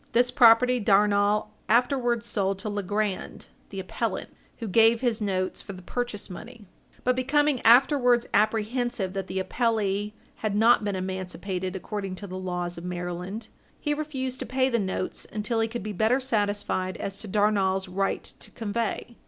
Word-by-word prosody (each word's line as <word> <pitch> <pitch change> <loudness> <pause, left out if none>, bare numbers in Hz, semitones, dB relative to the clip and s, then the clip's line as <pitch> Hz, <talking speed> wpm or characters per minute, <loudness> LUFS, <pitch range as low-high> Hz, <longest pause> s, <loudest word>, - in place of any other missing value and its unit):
This 245 +1 +3
property 250 0 +6
Darnall 205 +1 +3 0.2
afterwards 240 0 +2
sold 195 -4 -1
to 205 +2 -5
Legrand, 205 0 -3 0.2
the 195 - -6
appellant, 190 - -3 0.3
who 230 - -5
gave 225 +3 +4
his 240 -3 0
notes 185 -2 -1
for 200 - -8
the 185 -1 -11
purchase 240 -1 -3
money. 215 +4 -10 0.4
But 250 0 +2
becoming 275 +1 +2
afterwards 245 0 +5
apprehensive 220 -1 +1
that 195 -1 -3
the 190 - -4
appellee 210 0 0 0.2
had 215 -2 -2
not 225 +1 +5
been 205 -1 -1
emancipated 185 0 -4
according 195 0 -4
to 200 - -8
the 185 -1 -6
laws 180 -2 -3
of - - -11
Maryland, 180 +4 -5 0.3
he 295 - 0
refused 270 -4 -3
to 260 - -4
pay 260 +2 +1
the 235 -2 +1
notes 190 -2 -3
until 215 +2 -1
he 225 - +2
could 235 -2 -5
be 210 0 -4
better 220 +7 +2
satisfied 205 -6 -1
as 195 0 -5
to 215 - -9
Darnall's 195 -2 +1
right 195 +2 -1
to - - -8
convey. 225 +1 -3
210 Hz, 160 wpm, -26 LUFS, 190-240 Hz, 0.4 s, property